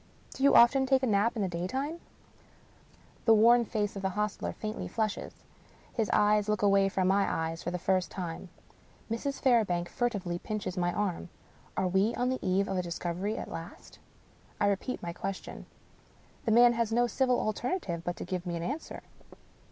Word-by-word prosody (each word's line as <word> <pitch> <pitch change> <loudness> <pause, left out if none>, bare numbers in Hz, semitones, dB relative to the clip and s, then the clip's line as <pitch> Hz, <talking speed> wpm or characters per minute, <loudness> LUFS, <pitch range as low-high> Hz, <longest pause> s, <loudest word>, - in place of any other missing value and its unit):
Do - - -9
you 280 - +5
often 265 +3 +6
take 265 0 +3
a - - +4
nap 215 +1 +2
in 215 - -1
the - - 0
daytime? 260 - -3 0.6
" - - -29
The 225 - +7
worn 235 +3 +6
face 210 -2 -2
of 195 - -5
the 190 - 0
hostler 210 +2 -2
faintly 215 0 -5
flushes. 215 -2 -3 0.5
His 225 -4 -1
eyes 210 0 +3
look 210 -1 0
away 195 -1 +4
from 185 -1 0
my 195 +1 +2
eyes 165 +1 -2
for - - -3
the 180 - -2
first 185 +1 0
time. 175 0 -6 0.6
Mrs. 275 +5 -2
Fairbank 210 -10 +2
furtively 200 -8 -2
pinches 210 -3 -4
my 175 -1 0
arm. 190 -3 -2 0.5
Are 190 - +1
we 195 +5 +2
on 245 +1 0
the 260 - -1
eve 190 +1 +1
of 190 - -2
a - - +1
dis 170 -1 -5
covery 180 +5 -3
at - - -6
last? 165 +1 -9 0.6
I - - +2
repeat 200 +6 -1
my 170 0 -4
question. 190 +2 -6 0.8
The 225 - +1
man 240 +2 +7
has 230 -1 -1
no 240 +2 +3
civil 250 0 +1
alternative 215 - -2
but 175 0 -3
to - - -7
give 180 0 -4
me 170 - -2
an 170 - -4
answer. 280 - -5
205 Hz, 190 wpm, -30 LUFS, 180-235 Hz, 0.8 s, The